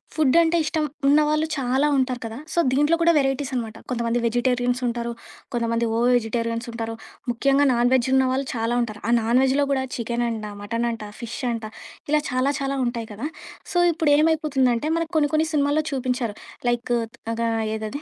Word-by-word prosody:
Food 305 -2 +3
అంటే 335 +1 +2
ఇష్టం 310 0 -1 0.2
ఉన్నవాళ్ళు 305 +2 +3
చాలా 265 +2 +1
ఉంటారు 255 -1 0
కదా! 225 0 -6 0.2
సో, 345 - +1
దీంట్లో 295 +5 +3
కూడా 335 0 +5
వెరైటీస్ 270 0 0
అనమాట. 225 -3 -3
కొంతమంది 235 -1 0
వెజిటేరియన్స్ 245 +1 +1
ఉంటారు. 235 0 -2 0.4
కొంతమంది 230 -1 0
ఓ - - +1 0.2
వెజిటేరియన్స్ 230 0 -1
ఉంటారు. 225 -1 -4 0.4
ముఖ్యంగా 275 +4 +3
నాన్‌వెజ్ 245 +1 +3
ఉన్న 265 0 +4
వాళ్ళు 265 +1 -1
చాలా 230 +1 0
ఉంటారు. 215 -3 -4
ఆ - - +3
నాన్‌వెజ్‌లో 260 +5 +3
గూడా 265 -1 +1
చికెనంట, 235 -2 -2 0.2
మటనంట, 230 +1 -2 0.2
ఫిష్ 235 -1 -6
అంట 230 -1 -4 0.5
ఇలా 305 0 +4
చాలా 255 +2 +1
చాలా 275 0 -2
ఉంటాయి 235 -2 -4
కదా! 230 +8 -4 0.5
సో, - - 0 0.2
ఇప్పుడు 315 -2 +1
ఏమైపోతుందంటే, 300 -5 +2
మనకు 330 0 -3
కొన్ని 290 -1 +3
కొన్ని 315 +1 +2
సినిమాల్లో 290 +1 +2
చూపించారు. 250 -4 -1 0.3
లైక్ 240 0 -1 0.4
అగా 230 0 -1 0.3
ఏదది. 220 +6 -5
250 Hz, 160 wpm, -23 LUFS, 235-285 Hz, 0.5 s, కూడా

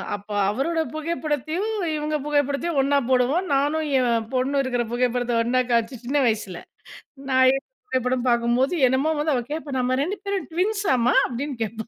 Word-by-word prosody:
அப்ப 205 +1 -12 0.2
அவரோட 315 +9 -1
புகைப்படத்தையும், 310 - -2 0.3
இவுங்க 305 0 -2
புகைப்படத்தையும் 290 +1 0
ஒன்னா 280 +1 +2
போடுவோம். 260 +8 +2
நானும் 295 +3 +1
என் 235 -3 +1
பொண்ணும் 270 +2 +1
இருக்கிற 245 -2 -1
புகைப்படத்தை 245 0 0
ஒன்னா 255 +2 +2
காம்ச்சு, 235 +1 0
சின்ன 280 +4 0
வயசுல. 210 -5 -2 0.7
நான் 260 0 +5
எடுத்த 270 - -5 0.2
புகைப்படம் 255 - -1
பார்க்கும்போது, 240 +5 +2
என்னமோ 270 +5 +1
வந்து 300 0 +1
அவ 245 - -1
கேப்பா. 300 -3 -4
"நம்ம 255 +1 +1
2 385 +7 -3
பேரும் 395 -1 -2
ட்வின்ஸ்ஸாமா?" 355 - +1
அப்டின்னு 255 +1 -5
கேப்பா. 220 +1 -6
265 Hz, 150 wpm, -23 LUFS, 245-305 Hz, 0.7 s, நான்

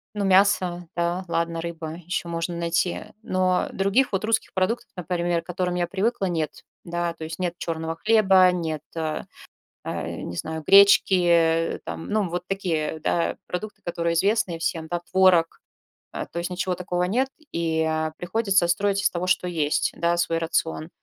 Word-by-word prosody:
Ну 205 -1 -1
мясо, 185 -3 +3
да, 175 +2 -1
ладно, 170 0 -1
рыба- 165 -2 -5
еще 180 0 -2
можно 170 +1 -3
найти, 170 +1 0 0.2
но 185 -2 +1
других 200 +7 +2
вот 195 +1 -1
русских 225 0 0
продуктов, 230 +6 0
например, 175 -1 -1
к - - -29
которым 180 0 -2
я 175 -1 0
привыкла, 200 +3 0
нет. 165 -4 -3 0.2
Да. 175 0 -2
То 160 - -9
есть, 160 +2 -6
нет 175 -1 -1
черного 165 -1 -3
хлеба, 190 -2 +5
нет, 160 -4 -3
э, 155 -2 -2 0.6
не 85 - -5
знаю, 160 - -4
гречки, 200 0 +7
э, 165 -1 +3
там, - - -6
ну 210 -3 +1
вот 175 +1 -3
такие, 165 -5 -1
да, 170 +2 0
продукты, 215 +4 -5
которые 170 -1 -1
известные 195 -1 +1
всем, 165 -1 -2
да, 175 +1 -2
творог. 185 -3 +4 0.5
А, - - -5
то - - -9
есть 170 +1 -2
ничего 180 0 -1
такого 180 0 -2
нет 235 +9 +1 0.2
и, 165 -1 0
а, 160 0 -1
приходится 195 -1 +1
строить 200 +2 +1
из - - +3
того, 175 0 -3
что 180 0 +2
есть, 155 -4 0
да, 170 +1 +2
свой 165 -1 0
рацион. 160 -1 -1
175 Hz, 170 wpm, -24 LUFS, 165-190 Hz, 0.6 s, гречки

